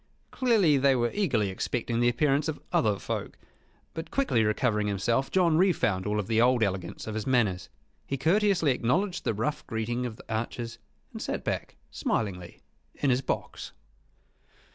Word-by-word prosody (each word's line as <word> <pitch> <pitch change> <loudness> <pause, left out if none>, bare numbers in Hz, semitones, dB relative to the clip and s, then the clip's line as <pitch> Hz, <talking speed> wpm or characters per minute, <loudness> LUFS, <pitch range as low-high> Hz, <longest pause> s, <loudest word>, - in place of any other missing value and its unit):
Clearly 215 - +3
they 135 0 +4
were 120 -1 +1
eagerly 120 - +1
expecting 115 +4 -2
the 120 0 +4
appearance 140 +4 +1
of 155 - -3
other 105 -3 +2
folk; - - -5 0.6
but, 160 0 -6
quickly 260 - +1
recovering 105 0 +1
himself, 115 +7 0
John 170 -4 +3
re 190 +1 +5
found 100 - 0
all 105 0 0
the 110 +2 +1
old 125 -1 +4
elegance 95 -3 -3
of 110 - -5
his 110 +2 -4
manners. 105 - +1 0.4
He 135 - -2
courteously 175 - +3
acknowledged 175 - 0
the 110 - 0
rough 115 +8 -2
greeting 120 +3 -2
of 115 - -7
the - - -14
archers, 115 +1 -4 0.3
and - - -7
sat - - -3
back - - -3 0.2
smilingly 90 -5 -3 0.3
in 140 - +1
his 125 +1 +2
box. - - -4
120 Hz, 165 wpm, -28 LUFS, 110-150 Hz, 0.6 s, re